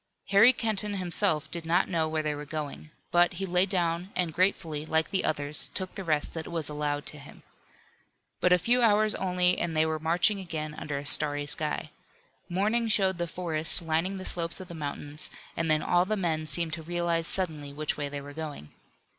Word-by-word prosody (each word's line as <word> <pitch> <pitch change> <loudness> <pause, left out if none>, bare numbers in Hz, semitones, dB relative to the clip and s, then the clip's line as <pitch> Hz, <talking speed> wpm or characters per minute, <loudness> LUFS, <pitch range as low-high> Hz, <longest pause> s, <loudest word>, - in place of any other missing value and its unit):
Harry 200 +5 +7
Kenton 215 -4 -2
himself 175 -4 -1
did 170 -1 -5
not 170 +3 +2
know 165 -3 0
where 155 0 -1
they 150 -1 -1
were 145 0 -6
going. 150 0 -6 0.2
But 175 +1 +4
he 190 +2 -3
lay 180 +1 +2
down 175 -1 0
and 175 -3 -1
gratefully, 165 -4 0
like 160 +2 0
the 190 -2 +1
others, 145 0 0
took 185 -1 -3
the 195 - -6
rest 155 -4 -1
that 160 -1 -5
was 165 -3 -4
allowed 145 -1 -2
to 150 - -6
him. 140 - -14 1.0
But 180 - +2
a 180 - +7
few 240 +8 +2
hours 215 -1 +4
only 180 -1 +1
and 165 -2 -2
they 155 - +4
were 160 0 -2
marching 175 +6 +2
again 155 -4 -5
under 150 -2 -5
a 140 - -6
starry 145 -1 +4
sky. 150 +1 0 0.6
Morning 215 +6 +1
showed 190 -4 +2
the 175 - -1
forest 165 -1 +3
lining 165 +4 0
the 190 -1 -7
slopes 170 0 -2
of 185 -1 -10
the - - -7
mountains 150 -1 -3 0.3
and 165 -1 -1
then 155 0 +3
all 175 0 +3
the 215 +2 -1
men 160 -4 -1
seemed 165 0 +1
to 165 - -3
realize 170 0 -1
suddenly 155 -7 +1
which 150 +1 -2
way 145 -1 -3
they 140 0 -5
were 145 +1 -10
going. 150 - -7
165 Hz, 205 wpm, -28 LUFS, 155-185 Hz, 1.0 s, Harry